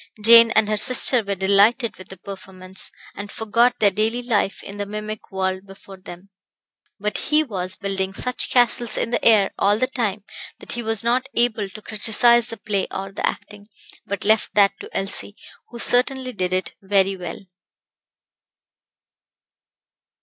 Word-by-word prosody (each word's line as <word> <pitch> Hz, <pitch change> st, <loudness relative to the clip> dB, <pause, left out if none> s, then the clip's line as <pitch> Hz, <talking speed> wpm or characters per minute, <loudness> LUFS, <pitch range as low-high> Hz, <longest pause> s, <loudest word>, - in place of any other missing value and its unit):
Jane 230 Hz, +2 st, +8 dB
and 220 Hz, -1 st, +3 dB
her 215 Hz, 0 st, -1 dB
sister 250 Hz, +2 st, +4 dB
were 200 Hz, 0 st, -3 dB
delighted 200 Hz, +5 st, +2 dB
with 185 Hz, -, -12 dB
the 190 Hz, -, -12 dB
performance, 190 Hz, 0 st, -7 dB, 0.2 s
and 205 Hz, +1 st, -8 dB
forgot 235 Hz, +3 st, +1 dB
their 205 Hz, -2 st, +3 dB
daily 220 Hz, +5 st, -1 dB
life 215 Hz, -5 st, -1 dB
in 200 Hz, -, -10 dB
the 205 Hz, 0 st, -4 dB
mimic 210 Hz, +1 st, -7 dB
world 190 Hz, 0 st, -3 dB
before 195 Hz, 0 st, -14 dB
them; 185 Hz, +1 st, -13 dB, 0.7 s
but 210 Hz, 0 st, -3 dB
he 305 Hz, +1 st, +3 dB
was 185 Hz, -7 st, -2 dB
building 195 Hz, -2 st, -3 dB
such 250 Hz, +6 st, -2 dB
castles 240 Hz, -2 st, +2 dB
in 230 Hz, -, -2 dB
the 240 Hz, -, -1 dB
air 210 Hz, -4 st, +4 dB
all 205 Hz, +1 st, +2 dB
the 255 Hz, -, +1 dB
time 220 Hz, -6 st, -3 dB, 0.3 s
that -, -, -9 dB
he 240 Hz, -, -3 dB
was 225 Hz, -1 st, -1 dB
not 250 Hz, +3 st, 0 dB
able 220 Hz, -4 st, 0 dB
to 215 Hz, +3 st, -12 dB
criticise 230 Hz, +2 st, +3 dB
the 230 Hz, -, -7 dB
play 200 Hz, -2 st, -2 dB
or 195 Hz, 0 st, -6 dB
the -, -, -7 dB
acting, 205 Hz, 0 st, -7 dB, 0.4 s
but 200 Hz, 0 st, -4 dB
left 220 Hz, +1 st, +1 dB
that 200 Hz, -1 st, +5 dB
to -, -, -10 dB
Elsie, 195 Hz, +1 st, -3 dB, 0.3 s
who 240 Hz, -, -10 dB
certainly 255 Hz, +2 st, 0 dB
did 185 Hz, -3 st, -3 dB
it 185 Hz, 0 st, -2 dB
very 195 Hz, 0 st, +1 dB
well. 175 Hz, -3 st, -7 dB
210 Hz, 165 wpm, -21 LUFS, 195-235 Hz, 0.7 s, Jane